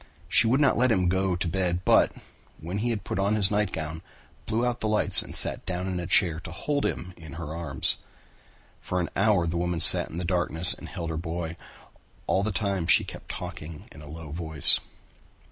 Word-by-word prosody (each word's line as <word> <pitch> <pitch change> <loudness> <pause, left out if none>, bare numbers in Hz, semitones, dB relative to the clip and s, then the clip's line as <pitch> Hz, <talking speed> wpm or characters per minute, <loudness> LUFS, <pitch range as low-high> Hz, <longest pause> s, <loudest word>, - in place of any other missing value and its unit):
She 115 - +4
would 130 +5 +1
not 140 -5 +1
let 125 0 +2
him 90 -5 0
go 95 0 -1
to 85 - -4
bed 90 0 -2
but, - - +3 0.5
when 90 +6 -6
he 120 +3 -2
had 110 -3 -4
put - - -5
on 100 +2 0
his 100 -2 +2
nightgown, 80 -7 -4 0.5
blew 115 +3 -2
out 120 -1 -3
the 110 - -4
lights 105 0 +5
and - - -7
sat - - +4
down 90 0 -4
in 95 -1 -4
a 85 - -6
chair 85 -4 +1
to 80 - -10
hold 145 - -3
him 90 +1 -7
in 80 -4 -13
her 80 -1 -8
arms. 75 -6 -3 0.8
For 90 - -4
an 85 - -3
hour 100 -3 +1
the 85 +1 -4
woman 90 0 -3
sat - - +9
in 80 - -9
the 90 - -5
darkness 85 -1 +3
and - - -12
held 85 -2 -7
her 80 - -5
boy. 80 0 -6 0.7
All 95 - -1
the 110 +2 -3
time 100 -4 -3
she 85 - +3
kept - - -12
talking 75 0 -8
in - - -14
a 75 - -13
low 80 -1 -10
voice. 80 -2 +5
90 Hz, 215 wpm, -25 LUFS, 80-100 Hz, 0.8 s, sat